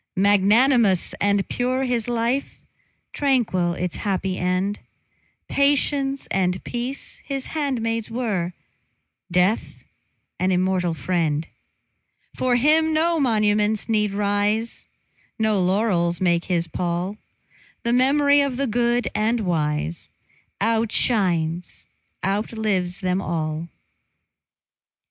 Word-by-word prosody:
Magnanimous 205 Hz, +1 st, +4 dB
and 200 Hz, -1 st, +2 dB
pure 255 Hz, +2 st, -1 dB
his 245 Hz, -3 st, -1 dB
life, 240 Hz, +3 st, -1 dB, 0.6 s
Tranquil 230 Hz, -11 st, +1 dB
its 180 Hz, 0 st, -4 dB
happy 190 Hz, -2 st, -2 dB
end; 185 Hz, +3 st, -1 dB, 0.7 s
Patience 280 Hz, -1 st, +1 dB
and 185 Hz, -1 st, 0 dB
peace 245 Hz, +3 st, -5 dB
his 275 Hz, -2 st, -4 dB
handmaids 230 Hz, -7 st, -2 dB
were, 210 Hz, -7 st, -2 dB, 0.8 s
Death 180 Hz, +5 st, 0 dB, 0.6 s
an 185 Hz, +1 st, +1 dB
immortal 180 Hz, -2 st, +1 dB
friend. 160 Hz, -1 st, -1 dB, 0.9 s
For 255 Hz, -1 st, +1 dB
him 310 Hz, +5 st, +3 dB
no 330 Hz, +1 st, +2 dB
monuments 215 Hz, -4 st, +1 dB
need 210 Hz, -2 st, +1 dB
rise, 205 Hz, +3 st, -1 dB, 0.5 s
No 215 Hz, -3 st, +1 dB
laurels 180 Hz, -3 st, +1 dB
make 175 Hz, -2 st, +1 dB
his 175 Hz, -3 st, 0 dB
pall; 175 Hz, +4 st, -3 dB, 0.7 s
The 235 Hz, -, +1 dB
mem'ry 285 Hz, +3 st, +4 dB
of 275 Hz, -3 st, -1 dB
the 275 Hz, -, 0 dB
good 240 Hz, +1 st, +1 dB
and 225 Hz, +2 st, +1 dB
wise 150 Hz, -, -2 dB, 0.5 s
Outshines, 195 Hz, -6 st, 0 dB, 0.4 s
outlives 195 Hz, -2 st, -1 dB
them 185 Hz, 0 st, 0 dB
all. 160 Hz, -1 st, -3 dB
210 Hz, 100 wpm, -23 LUFS, 180-245 Hz, 0.9 s, Magnanimous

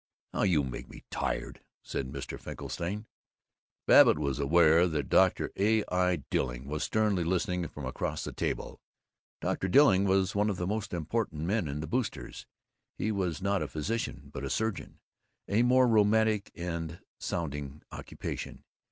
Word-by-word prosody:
"Oh, -, -, -1 dB
you 85 Hz, -7 st, +3 dB
make 65 Hz, -2 st, -6 dB
me -, -, -12 dB
tired!" -, -, -3 dB, 0.2 s
said 65 Hz, -, -3 dB
Mr. 70 Hz, -2 st, -6 dB
Finkelstein. 100 Hz, +6 st, -5 dB, 0.8 s
Babbitt -, -, +7 dB
was 70 Hz, -4 st, -1 dB
aware 80 Hz, +4 st, +5 dB
that 75 Hz, -4 st, -2 dB
Dr. -, -, +3 dB
A. 110 Hz, +2 st, +3 dB
I. 90 Hz, -4 st, +1 dB
Dilling 60 Hz, 0 st, -1 dB
was 75 Hz, +2 st, -3 dB
sternly 105 Hz, -5 st, +1 dB
listening 90 Hz, 0 st, 0 dB
from 75 Hz, -, -8 dB
across 65 Hz, -, -3 dB
the -, -, -4 dB
table. -, -, -3 dB, 0.6 s
Dr. 95 Hz, -, -1 dB
Dilling 100 Hz, -3 st, +5 dB
was 95 Hz, 0 st, +2 dB
one 105 Hz, +1 st, +2 dB
of 100 Hz, -, -2 dB
the 90 Hz, -, -2 dB
most 105 Hz, +2 st, -2 dB
important 85 Hz, -1 st, -2 dB
men 95 Hz, 0 st, 0 dB
in 75 Hz, +1 st, -4 dB
the 80 Hz, -, -5 dB
Boosters'. 120 Hz, -, -3 dB, 0.5 s
He 110 Hz, -, 0 dB
was 95 Hz, -4 st, -2 dB
not 100 Hz, -1 st, +1 dB
a -, -, -1 dB
physician 110 Hz, +10 st, -4 dB
but -, -, -5 dB
a 70 Hz, -, -3 dB
surgeon, 110 Hz, +5 st, -2 dB, 0.5 s
a 105 Hz, +3 st, +2 dB
more 125 Hz, +1 st, +5 dB
romantic 110 Hz, -1 st, +3 dB
and 85 Hz, -1 st, -4 dB, 0.2 s
sounding 75 Hz, -3 st, -4 dB
occupation. -, -, -6 dB
90 Hz, 155 wpm, -30 LUFS, 75-105 Hz, 0.8 s, Babbitt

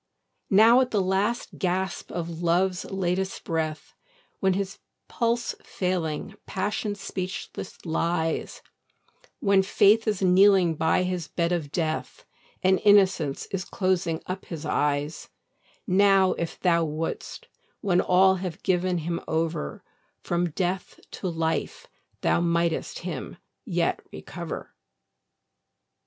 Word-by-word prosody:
Now, 225 Hz, +5 st, +7 dB
at 255 Hz, -, 0 dB
the 210 Hz, -, +1 dB
last 195 Hz, +5 st, -1 dB
gasp 185 Hz, 0 st, -2 dB
of 170 Hz, -1 st, -4 dB
Love's 180 Hz, +2 st, +1 dB
latest 190 Hz, 0 st, -2 dB
breath, 160 Hz, -2 st, -3 dB, 0.5 s
When, 190 Hz, -1 st, +2 dB
his 195 Hz, +1 st, -3 dB, 0.3 s
pulse 235 Hz, 0 st, 0 dB
failing, 180 Hz, -1 st, -2 dB
Passion 205 Hz, +2 st, -2 dB
speechless 190 Hz, -1 st, -6 dB
lies, 165 Hz, 0 st, -1 dB, 0.8 s
When 195 Hz, -1 st, +4 dB
Faith 205 Hz, +3 st, +4 dB
is 210 Hz, -3 st, 0 dB
kneeling 185 Hz, -1 st, +5 dB
by 160 Hz, +3 st, +2 dB
his 180 Hz, -3 st, -2 dB
bed 170 Hz, +2 st, -1 dB
of 160 Hz, -5 st, -2 dB
death, 160 Hz, -1 st, -3 dB, 0.4 s
And 185 Hz, 0 st, +3 dB
Innocence 190 Hz, -8 st, +4 dB
is 190 Hz, -2 st, -2 dB
closing 175 Hz, -3 st, -1 dB
up 185 Hz, +1 st, -5 dB
his 160 Hz, -2 st, -7 dB
eyes; 145 Hz, +1 st, -1 dB, 0.6 s
Now, 195 Hz, -2 st, +4 dB
if 170 Hz, -, -4 dB
thou 170 Hz, -2 st, +3 dB
wouldst, 160 Hz, +1 st, -4 dB, 0.3 s
when 180 Hz, -3 st, +3 dB
all 190 Hz, +1 st, +4 dB
have 180 Hz, -3 st, -6 dB
given 180 Hz, 0 st, +1 dB
him 170 Hz, +1 st, -3 dB
over, 160 Hz, -, -2 dB, 0.4 s
From 175 Hz, 0 st, 0 dB
death 180 Hz, +3 st, -3 dB
to 190 Hz, -, -5 dB
life 160 Hz, -1 st, -2 dB, 0.4 s
thou -, -, +2 dB
mightst 170 Hz, -1 st, 0 dB
him -, -, -5 dB, 0.3 s
yet -, -, 0 dB
recover. -, -, -7 dB
180 Hz, 115 wpm, -26 LUFS, 165-195 Hz, 0.8 s, Now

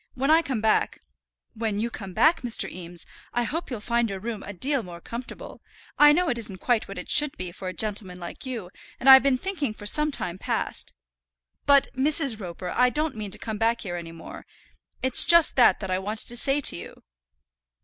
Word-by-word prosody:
When 270 Hz, +3 st, 0 dB
I 325 Hz, +1 st, +6 dB
come 260 Hz, -8 st, -3 dB
back 220 Hz, -1 st, 0 dB, 0.2 s
" -, -, -56 dB
"When 220 Hz, -2 st, -3 dB
you 230 Hz, +3 st, -2 dB
come 190 Hz, -4 st, -8 dB
back, 325 Hz, +1 st, +3 dB
Mr. 245 Hz, -3 st, 0 dB
Eames, 175 Hz, -1 st, -7 dB, 0.3 s
I 240 Hz, -, 0 dB
hope 325 Hz, +8 st, -4 dB
you'll 245 Hz, -5 st, -5 dB
find 235 Hz, +1 st, 0 dB
your 195 Hz, -1 st, -5 dB
room 220 Hz, +1 st, -5 dB
a -, -, -8 dB
deal 265 Hz, +8 st, 0 dB
more 175 Hz, -4 st, -10 dB
comfortable. 235 Hz, +7 st, -8 dB, 0.4 s
I 295 Hz, 0 st, +8 dB
know 350 Hz, +4 st, +2 dB
it 240 Hz, -, -1 dB
isn't 210 Hz, -4 st, -1 dB
quite 235 Hz, +3 st, 0 dB
what 195 Hz, -, -9 dB
it -, -, -6 dB
should 295 Hz, -2 st, +2 dB
be 185 Hz, -1 st, -5 dB
for 185 Hz, +2 st, -8 dB
a 185 Hz, -, -4 dB
gentleman 195 Hz, -4 st, 0 dB
like 170 Hz, -1 st, -9 dB
you, 230 Hz, -9 st, -6 dB, 0.3 s
and 255 Hz, -, -3 dB
I've 265 Hz, 0 st, +10 dB
been 275 Hz, -2 st, +2 dB
thinking 295 Hz, -, -3 dB
for 205 Hz, -, -11 dB
some 300 Hz, +8 st, +4 dB
time 180 Hz, -9 st, -5 dB
past -, -, -4 dB, 0.4 s
" -, -, -56 dB
"But, 280 Hz, -1 st, +6 dB
Mrs. 275 Hz, -3 st, +1 dB
Roper, 180 Hz, -1 st, -6 dB
I 250 Hz, 0 st, +3 dB
don't 300 Hz, +1 st, -2 dB
mean 210 Hz, -2 st, -5 dB
to -, -, -3 dB
come 220 Hz, -2 st, -6 dB
back 230 Hz, +1 st, +1 dB
here 175 Hz, -4 st, -5 dB
any 170 Hz, -1 st, -7 dB
more. 165 Hz, 0 st, -11 dB, 0.6 s
It's 260 Hz, -1 st, +6 dB
just 340 Hz, -2 st, +5 dB
that 245 Hz, -, +5 dB
that 190 Hz, -2 st, -4 dB
I 185 Hz, -, 0 dB
want 210 Hz, +3 st, -5 dB
to 240 Hz, -, -3 dB
say 275 Hz, +4 st, +1 dB
to -, -, +4 dB
you." -, -, -10 dB
230 Hz, 220 wpm, -25 LUFS, 190-270 Hz, 0.6 s, I've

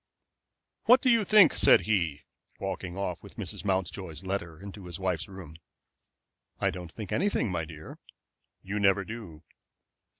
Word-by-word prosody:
"What 245 Hz, +2 st, +7 dB
do 255 Hz, -, +5 dB
you 230 Hz, -2 st, +4 dB
think?" 205 Hz, -5 st, +6 dB
said -, -, +6 dB
he, 85 Hz, -10 st, 0 dB, 0.4 s
walking 95 Hz, -1 st, -4 dB
off 90 Hz, -3 st, -3 dB
with -, -, -13 dB
Mrs. -, -, -3 dB
Mountjoy's 95 Hz, -3 st, -2 dB
letter 90 Hz, -4 st, -4 dB
into 100 Hz, -1 st, -9 dB
his 85 Hz, 0 st, -7 dB
wife's 90 Hz, -4 st, -1 dB
room. 90 Hz, -5 st, -11 dB, 1.0 s
"I -, -, +1 dB
don't 90 Hz, -3 st, -8 dB
think 105 Hz, -1 st, -8 dB
anything, 185 Hz, -, +1 dB
my 80 Hz, -2 st, -2 dB
dear." 80 Hz, -1 st, -11 dB, 0.6 s
"You 100 Hz, +2 st, -3 dB
never 100 Hz, -1 st, +3 dB
do." 95 Hz, -9 st, -9 dB
95 Hz, 145 wpm, -29 LUFS, 85-105 Hz, 1.0 s, What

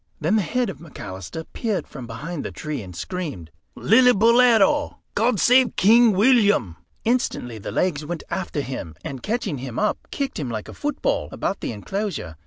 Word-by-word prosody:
Then 165 Hz, +7 st, +1 dB
the 215 Hz, -, +3 dB
head 240 Hz, +3 st, -1 dB
of -, -, -13 dB
McAlister 155 Hz, -, -8 dB
peered 220 Hz, -5 st, -2 dB
from 125 Hz, -4 st, -9 dB
behind 145 Hz, +8 st, -5 dB
the -, -, -4 dB
tree, 150 Hz, -5 st, -5 dB
and 90 Hz, -3 st, -10 dB
screamed 145 Hz, -, -5 dB, 0.3 s
"Lillibulero! 240 Hz, +3 st, +5 dB, 0.2 s
God 225 Hz, 0 st, +2 dB
save 250 Hz, +4 st, +4 dB
King 225 Hz, +3 st, +6 dB
William!" 205 Hz, -, +3 dB, 0.3 s
Instantly 225 Hz, -, -1 dB
the -, -, -6 dB
legs 160 Hz, -5 st, 0 dB
went 165 Hz, +2 st, -5 dB
after 170 Hz, -5 st, -2 dB
him, 110 Hz, -, -6 dB
and 135 Hz, -2 st, -5 dB
catching 205 Hz, -, -2 dB
him 125 Hz, -2 st, -6 dB
up 210 Hz, -, -1 dB
kicked 275 Hz, -7 st, -3 dB
him 135 Hz, -5 st, -3 dB
like 110 Hz, -2 st, -4 dB
a -, -, -9 dB
football 295 Hz, -1 st, -1 dB
about 195 Hz, -, -2 dB
the -, -, -3 dB
enclosure. 145 Hz, -, -4 dB
185 Hz, 170 wpm, -23 LUFS, -, 0.3 s, King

